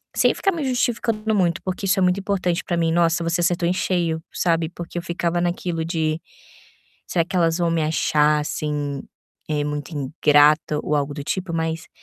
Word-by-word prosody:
sem - - +4
ficar 390 - +1
me 325 -3 -3
justificando 230 -3 0
muito, 175 -4 +1
porque 185 +1 -3
isso 195 +1 +2
é - - +1
muito 180 +1 +2
importante 190 -3 -1
para 175 - -2
mim. 165 -1 +1
Nossa, 170 0 +2
você 170 +1 0
acertou 175 0 +1
em 180 - +2
cheio, 170 -4 -1
sabe, 165 -2 +1
porque 175 0 -8
eu - - -1
ficava 170 -1 -1
naquilo 175 -1 -2
de 160 -1 -1 0.9
Será 170 -2 +1
que 175 - -10
elas 165 -1 +2
vão 170 -1 +1
me 165 -1 +1
achar, 150 -1 +2
assim, 145 -2 -3 0.5
eh, 150 -1 0
muito 145 0 -4
ingrata 150 +1 +3
ou 150 - -1
algo 145 0 -1
do 145 -1 -6
tipo? 185 0 -3
Mas 160 0 -2
170 Hz, 190 wpm, -22 LUFS, 155-180 Hz, 0.9 s, sem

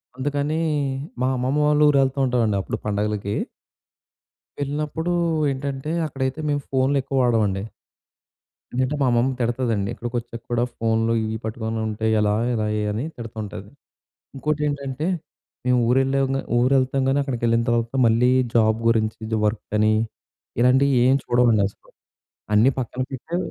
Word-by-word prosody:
అందుకని, 145 +3 -1 0.6
మా 130 - +2
అమ్మమ్మ 130 +4 0
వాళ్ళ 150 0 +3
ఊరు 140 - +3
వెళ్తూంటామండి, 125 -6 +1
అప్పుడు - - -4
పండగలకి... 105 -1 -1 1.2
వెళ్ళినప్పుడు 150 +4 -2 0.4
ఏంటంటే, 135 +2 -4
అక్కడైతే 135 0 -3
మేము 145 -1 0
ఫోన్‌లు 135 +1 +2
ఎక్కువ 135 0 -3
వాడమండి. 105 -5 +1 1.1
ఇంట్లో 130 +3 0
మా - - +4
అమ్మమ్మ 120 +2 +2
తిడతదండి. 115 -4 0
ఇక్కడికి 120 +1 -6
వచ్చాక 115 0 -9
కూడా 120 0 +2
ఫోన్లు 115 0 +1
ఇవి 110 0 -2
పట్టుకుంటే, 110 -1 -3
ఎలా, 105 0 +2 0.2
ఎలా 110 -2 0 0.3
అని 110 +6 -2
తిడుతుంటది. 110 -4 -7 0.7
ఇంకోటేంటంటే, 145 0 -2 0.6
మేము 125 0 +3
ఊరెళ్ళాంగా 135 +1 +2 0.2
ఊరు 125 +3 +3
వెళ్తాం 130 +1 0
గాని, 135 +1 +2
అక్కడికి 125 -4 -4
వెళ్ళిన 115 0 +3
తర్వాత 115 +1 0
మళ్ళీ 120 +3 +4 0.2
జాబ్ 110 -1 +3
గురించి, 110 -1 +1
ఇది 110 -1 -1
వర్క్ 105 +1 -2
అని, 110 0 +4 0.7
ఇలాంటియేమి 130 +1 +4
చూడమండి 120 -4 +3
అసలు. - - -20 0.6
అన్నీ 115 +6 +5
పక్కన 125 +1 -5
పెట్టి 160 +7 -4
125 Hz, 130 wpm, -23 LUFS, 110-135 Hz, 1.2 s, అన్నీ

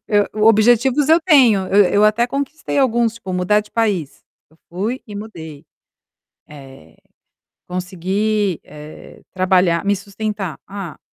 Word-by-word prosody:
Eu 205 -1 +2 0.2
objetivos 240 +6 +3
eu 325 +2 +5
tenho, 250 - +4
e 200 -3 +4
eu 205 +1 +4
até 215 +3 +2
conquistei 280 +3 -4
alguns, 235 -3 +1
tipo, 195 -5 -8
mudar 180 +4 +1
de 210 - -15
país. 200 -10 -2 0.3
Eu 160 - -26
fui 210 +9 -3
e 205 - -10
mudei. 165 -8 -9 0.9
Eh, 135 - -14 0.7
consegui, 190 +2 -2
eh, 150 0 -13
trabalhar 185 -2 +1
me 200 0 +2
sustentar. 200 -4 -5
Ah, 195 -4 -8
205 Hz, 130 wpm, -18 LUFS, 180-225 Hz, 0.9 s, eu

